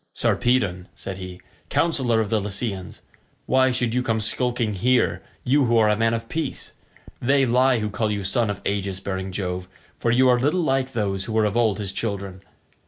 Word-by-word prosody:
"Sarpedon," 100 -8 +1
said 95 -1 -7
he, 90 -1 -8 0.3
"councillor 130 -9 +2
of 110 - -3
the 110 -2 +2
Lycians, 100 -2 -4 0.4
why 130 0 +3
should 120 -2 0
you 125 - +1
come 115 -2 0
skulking 120 0 0
here 125 +6 +2 0.2
you 140 +2 +3
who 120 -1 +3
are 110 -1 +5
a 105 - +3
man 115 +1 +2
of 115 0 -5
peace? 155 -1 -4 0.5
They 135 +2 +3
lie 125 +1 +3
who 105 -2 -2
call 105 +2 -1
you 100 -1 -2
son 105 +3 +1
of 100 - -4
aegis 100 -2 -2
bearing 95 -1 -4
Jove, 90 -1 -3 0.3
for 120 - 0
you 130 +2 +4
are 125 -1 +4
little 155 +8 +1
like 135 -3 0
those 100 -4 -1
who 110 - -5
were 110 -1 +3
of 105 0 -1
old 115 -4 +2
his 100 -3 -4
children. 100 -3 -4
110 Hz, 195 wpm, -23 LUFS, 100-125 Hz, 0.5 s, are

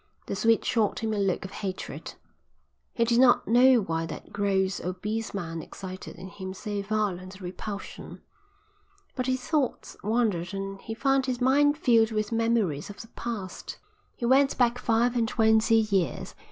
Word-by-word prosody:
The - - -3
Swede 225 +3 +3
shot 220 -4 +1
him 220 -1 0
a 210 - -1
look 195 -1 0
of 190 - -8
hatred. 190 -2 -6 0.8
He 230 - +2
did 235 +1 +3
not 250 -1 +5
know 245 +1 +6
why 165 -2 -2
that - - -9
gross, 195 -1 +1
obese 210 +5 -3
man 165 -4 -4
excited 185 +1 -8
in 185 - -9
him 190 -1 -7
so 205 0 -4
violent 200 -3 -2
a - - -11
repulsion. 195 +3 -7 1.0
But 255 -1 -2
his 255 -1 -1
thoughts 295 -6 -1
wandered 210 -4 0
and 195 0 -5
he 225 - -6
found 270 +1 +2
his 250 -2 -1
mind 290 +3 +4
filled 230 -6 +4
with 215 -1 -2
memories 225 -9 0
of 205 - -10
the 225 - -10
past. 215 -7 -6 0.4
He 240 - -4
went 270 +3 +4
back 245 -1 +2
five 235 +1 +2
and 230 -2 +2
twenty 220 0 +3
years. 205 -5 0
220 Hz, 165 wpm, -27 LUFS, 195-240 Hz, 1.0 s, know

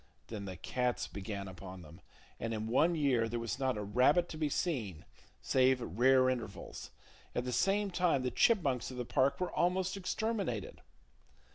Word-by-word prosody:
Then 105 -3 -5
the 95 -2 -6
cats 125 +7 -1
began 100 0 -6
upon 95 -1 -9
them; 85 +4 -14 0.4
and 115 -1 -2
in 110 0 -3
one 150 +9 +3
year 130 -7 +2
there 120 +1 -2
was 115 +3 -3
not 130 -4 0
a 105 - -3
rabbit 130 - +3
to - - -6
be 155 -1 0
seen, 120 - -2 0.4
save 130 0 +3
at 120 - -6
rare 130 +5 +5
intervals. 120 -5 -4 0.5
At 125 - 0
the 125 - -3
same 200 +4 +2
time 175 -7 +2
the 125 - -1
chipmunks 145 - +2
of 130 - -8
the 125 - -3
park 130 +3 +2
were 180 -1 -1
almost 185 +2 +1
exterminated. 195 - -2
125 Hz, 175 wpm, -33 LUFS, 110-165 Hz, 0.5 s, rare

